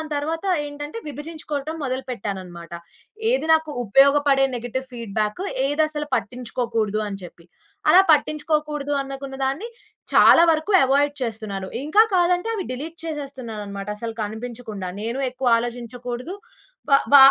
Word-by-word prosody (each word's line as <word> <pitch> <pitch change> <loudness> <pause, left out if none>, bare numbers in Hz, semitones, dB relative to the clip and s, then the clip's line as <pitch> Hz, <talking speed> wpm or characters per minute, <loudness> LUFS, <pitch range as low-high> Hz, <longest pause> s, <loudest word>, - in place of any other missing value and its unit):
తరువాత 320 +5 -2 0.2
ఏంటంటే 290 +6 -7
విభజించుకోవడం 300 0 -5
మొదలు 260 0 -2
పెట్టానన్నమాట. 185 -6 -6 0.6
ఏది - - 0
నాకు 315 -1 +1
ఉపయోగపడే 275 +4 +5
నెగెటివ్ 245 +2 -4
ఫీడ్‌బ్యాకు? 220 - -2 0.2
ఏదసలు 300 0 0
పట్టించుకోకూడదు 230 -3 -2
అని 195 - -6
చెప్పి. 170 -1 -12 0.4
అలా 365 - +8
పట్టించుకోకూడదనుకున్న 290 -3 -1
దాన్ని 290 - -2 0.5
చాలా 335 - +8
వరకు 315 +4 +1
అవాయిడ్ 285 +2 +3
చేస్తున్నాను. 215 -5 -4 0.2
ఇంకా 320 +9 +5
కాదంటే 355 +3 +2
అవి 405 -4 -2
డిలీట్ 310 +6 -6
చేసేస్తున్నానన్నమాట, 235 -10 -6
అసలు 225 0 -5
కనిపించకుండా. 220 -2 -6
నేను 235 +4 -3
ఎక్కువ 255 0 -3
ఆలోచించకూడదు. 240 +4 -5 0.6
వ 275 - +7 0.2
వ - - +11
270 Hz, 115 wpm, -23 LUFS, 230-300 Hz, 0.6 s, వ